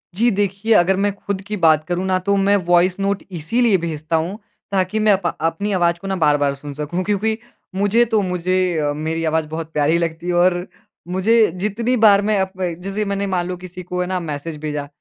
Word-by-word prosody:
जी 235 +5 +3
देखिए, 205 +2 0
अगर 185 0 +4
मैं 200 +1 +1
खुद 200 -1 -4
की 210 0 -3
बात 155 -3 +4
करूँ 180 +1 -1
न 185 - +2
तो 200 0 +2
मैं 200 +1 +3
वॉइस 175 +2 +3
नोट 200 0 -1
इसीलिए 200 +6 +1
भेजता 165 -2 -3
हूँ 170 +6 -1 0.3
ताकि 195 +2 0
मैं 215 -1 +4
अप 190 -2 -2 0.2
अपनी 165 +6 -1
आवाज़ 170 -2 +2
को 195 - -6
न 195 - -1
बार-बार 145 -2 +2
सुन 145 +1 -8
सकूँ 150 +5 -3
क्योंकि 210 +2 0 0.4
मुझे 205 +4 +3
तो 220 -2 +1
मुझे 180 -1 0
अ, 145 -1 0
मेरी 160 +2 -3
आवाज़ 160 -1 0
बहुत 160 0 -6
प्यारी 150 +3 +2
लगती 170 0 -3
है 180 - 0
और 175 +1 +2 0.4
मुझे 190 +6 +1 0.2
जितनी 215 +6 -1
बार 205 -2 +6
मैं 210 0 +1
अप 190 0 -1 0.3
जैसे 200 +2 -2
मैंने 200 0 -2
मान 180 -2 -1
लो 180 -1 -4
किसी 180 0 -9
को 180 0 -3
है 180 - -2
ना 185 -1 -1
मैसेज 155 -1 -5
भेजा 150 -2 -3
185 Hz, 210 wpm, -20 LUFS, 165-200 Hz, 0.4 s, बार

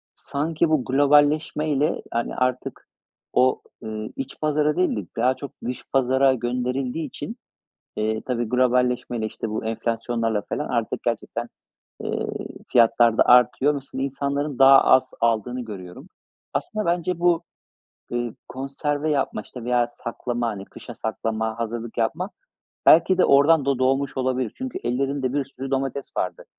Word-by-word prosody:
sanki 155 +3 -1
bu 155 -5 +2
globalleşmeyle, 145 +1 +2
yani, 115 0 -1
artık 130 0 -2 0.5
o, 130 0 +3 0.2
eee, 110 0 -5
iç 135 0 -6
pazara 150 0 +2
değil 180 - +1
de 105 -4 -4
daha 125 +3 +3
çok 135 +1 -8
dış 125 0 -4
pazara 130 +1 +4
gönderildiği 125 +4 -2
için, 225 - -7 0.6
eee, 110 +1 -1
tabii 120 -3 -1
globalleşmeyle, 125 -2 +1
işte, 110 0 -5
bu 110 - -3
enflasyonlarla 115 -1 -1
felan - - -2
artık - - -2
gerçekten, - - -3 0.6
ııı, - - -2 0.4
fiyatlar 115 -1 +5
da - - +6
artıyor. 125 +4 +5
Mesela, 135 -1 -6
insanların 140 0 -2
daha 135 0 +8
az 130 - +4
aldığını 115 +2 +1
görüyorum. 95 -5 -9 0.4
Aslında 215 -1 -2
bence 175 0 0
bu, 175 -1 +3 0.7
ııı, 120 -1 -2
konserve 145 +3 -2
yapma, 145 -2 0
işte, 125 - -10
veya 120 0 +2
saklama, 120 0 -4
hani, 100 -3 -4
kışa - - -11
saklama, 110 0 -3
hazırlık 115 0 -4
yapma 155 - 0 0.6
belki 170 +3 +6
de - - +5
oradan 145 +2 +5
da 140 -2 +1
doğmuş 135 +2 +1
olabilir. 130 -2 -1
Çünkü 260 -1 -5
ellerinde 135 +1 -1
bir 145 0 0
sürü 135 0 -8
domates 135 0 -2
vardı. - - -2
130 Hz, 140 wpm, -23 LUFS, 120-145 Hz, 0.7 s, daha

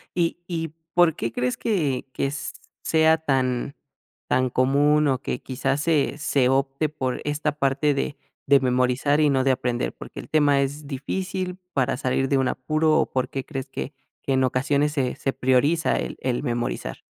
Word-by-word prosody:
Y 170 -1 +1
y, 165 -3 -3 0.2
¿por 175 -3 +4
qué 115 - -3
crees 125 +1 -1
que 155 - 0
que 140 - -1 0.5
sea 160 0 +4
tan 135 -3 -1 0.5
tan 130 0 +2
común, 145 +4 +3
o 130 -2 +1
que, 125 - -3
quizás, 135 +2 -1
se 150 -3 +1
se 140 -4 +2
opte 135 +3 +1
por 130 -4 -3
esta 150 +1 0
parte 140 +1 +2
de 140 +1 -2 0.3
de 140 0 +6
memorizar 130 +3 +2
y 150 -1 +4
no 135 -2 +2
de 135 - +3
aprender? 125 -2 -1
¿Por - - -10
qué - - -8
el - - -14
tema 145 -3 +4
es 140 +2 -3
difícil 180 +6 -3 0.2
para 130 -2 +1
salir 135 0 0
de 140 - +3
un 130 -1 +2
apuro? 155 +4 +1
O, - - +3
¿por 130 -1 -1
qué 135 - -4
crees 135 -3 -5
que 135 +1 -5 0.3
que 135 - 0
en 130 0 +3
ocasiones 140 +3 +1
se 130 -4 -1
se 135 - -2
prioriza 140 +6 +2
el - - -4
el 125 -2 -1
memorizar? 120 - -2
140 Hz, 180 wpm, -24 LUFS, 130-150 Hz, 0.5 s, de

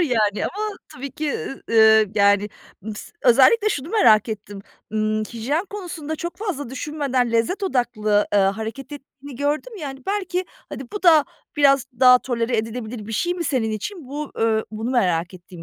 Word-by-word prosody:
yani 220 - +1
ama 420 +1 -4
tabii 275 +2 -8
ki, 300 -2 -2
ııı, 270 - -6
ııı, 220 -1 +6
yani 205 0 +3 0.3
mıs 210 0 -8
özellikle 275 - +5
şunu 290 -7 -3
merak 230 - +4
ettim. 205 -2 -6 0.3
Imm, 215 0 0
hijyen 250 - -2
konusunda 340 -6 -6
çok 345 +2 -5
fazla 345 - -4
düşünmeden 265 -3 -1
lezzet 230 - 0
odaklı, 240 - +1
ııı, 200 -1 +5
hareket 225 +7 -7
ettiğini 280 -1 -11
gördüm 300 - -2
ya, 310 -7 -5
hani, 270 -1 -11
belki 375 -2 -1 0.2
hadi 270 - -7
bu 415 - -5
da 320 -5 +6 0.3
biraz 275 -3 +4
daha 250 -1 +8
tolere 240 -1 -1
edilebilir 225 0 -4
bir 225 - -6
şey 350 +11 0
mi 350 -1 -4
senin 255 -7 0
için, 260 - -6
bu, 295 +1 -5
ııı, 220 -1 +1
bunu 220 +3 -4
merak 180 -8 +1
ettiğim 180 -1 -12
255 Hz, 170 wpm, -22 LUFS, 220-305 Hz, 0.3 s, daha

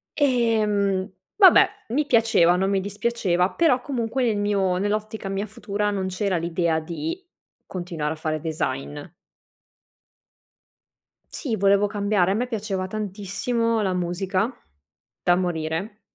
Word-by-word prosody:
Ehm, 215 -8 +2 0.3
vabbè, 385 -2 +7 0.2
mi 290 +5 +1
piaceva, 225 -9 +4
non 190 +2 +1
mi 195 -1 +2
dispiaceva, 200 -3 0
però 300 -7 +3
comunque 250 -1 -2
nel 220 -3 +1
mio 200 -3 +1
nell'ottica 210 +1 -2
mia 195 +2 -2
futura, 210 0 -2
non 190 -2 -2
c'era 185 0 -1
l'idea 165 -1 0
di 315 - -5 0.4
continuare 170 -4 -4
a - - -8
fare 155 0 -2
design. 145 -3 -3 2.4
Sì, 230 -8 -3
volevo 200 +1 +3
cambiare. 200 -2 +1
A - - +2
me 245 +3 -1
piaceva 200 -5 -3
tantissimo 215 +3 -1
la 190 -2 0
musica, 185 +4 -1 0.7
da 175 - +4
morire. 175 +4 -3
200 Hz, 125 wpm, -24 LUFS, 180-225 Hz, 2.4 s, vabbè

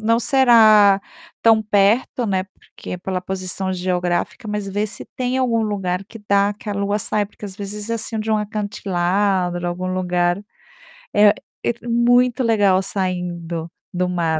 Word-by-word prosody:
não 230 +1 +2
será 220 -7 +5 0.4
tão 225 -1 +5
perto, 210 +4 +2
né, 190 -2 0
porque, 190 -1 -10
pela 185 0 -3
posição 190 0 -4
geográfica, 180 +3 -2
mas 210 -1 -3
vê 205 +2 -1
se 215 - -9
tem 255 0 -1
algum 235 -4 +1
lugar 195 -3 -2
que 225 +3 -12
dá, 200 +1 +3
que 210 - -11
a - - -1
lua 200 +1 -1
sai, 205 0 -1
porque 210 - -13
às 195 -2 -7
vezes 205 +2 -6
é - - +1
assim 225 0 -3
de 215 +1 -3
um 215 - +3
acantilado, 195 -3 -1
algum 185 +1 -3
lugar, 180 -1 0 0.8
eh 205 0 +6 0.3
et 235 0 -1
muito 245 +1 +2
legal 205 -5 +3
saindo, 175 -3 -3 0.2
do 180 0 -1
mar. 165 -3 0
200 Hz, 160 wpm, -20 LUFS, 185-220 Hz, 0.8 s, eh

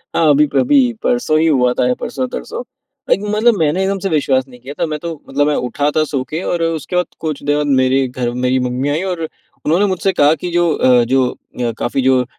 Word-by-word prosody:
हाँ 155 -3 +4
अभी-अभी 150 - +3 0.2
परसों 245 -11 +1
ही 165 - +3
हुआ 125 -5 +3
था, 125 0 +1
परसों-तरसों। 245 - -5 0.5
लाइक - - +3 0.2
मतलब 225 0 +3
मैंने 160 +3 +1
एकदम 195 0 -1
से 195 - -2
विश्वास 135 -5 +1
नहीं 125 -2 -15
किया 135 +4 -9
था। - - +2
मैं 150 -1 -4
तो 170 +1 -5 0.2
मतलब 145 +2 +1
मैं 150 - +1
उठा 145 +3 0
था 155 - +3
सो 135 - 0
के 160 +3 -3
और 170 -1 -1
अ, - - +2
उसके 165 +1 -3
बाद 180 -1 +2
कुछ 155 -3 -4
देर 145 0 +1
बाद 150 0 -1
मेरे 130 +1 +2
घर 125 -1 -3 0.2
मेरी 130 +1 +2
मम्मी 130 +3 -2
आई। 150 +3 0
और 175 - -4 0.4
उन्होंने 175 +7 +3
मुझसे 190 0 0
कहा 145 +1 +6
की, 175 +3 -5
"जो 175 -1 +2
अ, 125 -1 +4
जो 130 -1 +3
अ, 120 -1 -5
काफ़ी 125 +3 -1
जो 130 -1 +3
150 Hz, 230 wpm, -17 LUFS, 130-175 Hz, 0.5 s, कहा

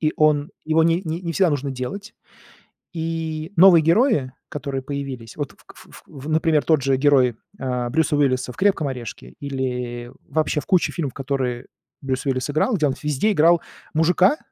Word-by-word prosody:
И 155 -1 +1
он 150 -1 +3
его 160 +1 +3
ни 165 +1 +3
не 165 +1 -3
всегда 185 0 +3
нужно 140 -1 -2
делать. 195 - -6 0.8
И 160 0 -4
новые 175 -2 +8
герои, 165 - +3 0.2
которые 140 -2 -4
появились, 135 -4 -6
вот, - - -4
кф - - -17
ф - - -14
ф 140 0 -11
например, 155 -1 +2
тот 155 -4 +3
же 135 0 +2
герой, 130 -4 +3 0.2
а-а, 125 -2 -2
Брюса 160 +2 +1
Уиллиса 130 -3 +1
в - - -18
"Крепком 185 -5 +2
орешке" 120 -8 -7
или 125 -3 -4 0.2
вообще 155 -1 0
в - - -14
куче 185 -4 +2
фильмов, 145 -6 -3
которые 130 -3 -3 0.3
Брюс 130 -1 -3
Уиллис 130 0 -1
играл, 195 - +1
где 155 - +1
он 135 - 0
везде 150 +8 +1
играл 170 -1 +4 0.3
мужика 180 - +3
145 Hz, 170 wpm, -22 LUFS, 130-165 Hz, 0.8 s, новые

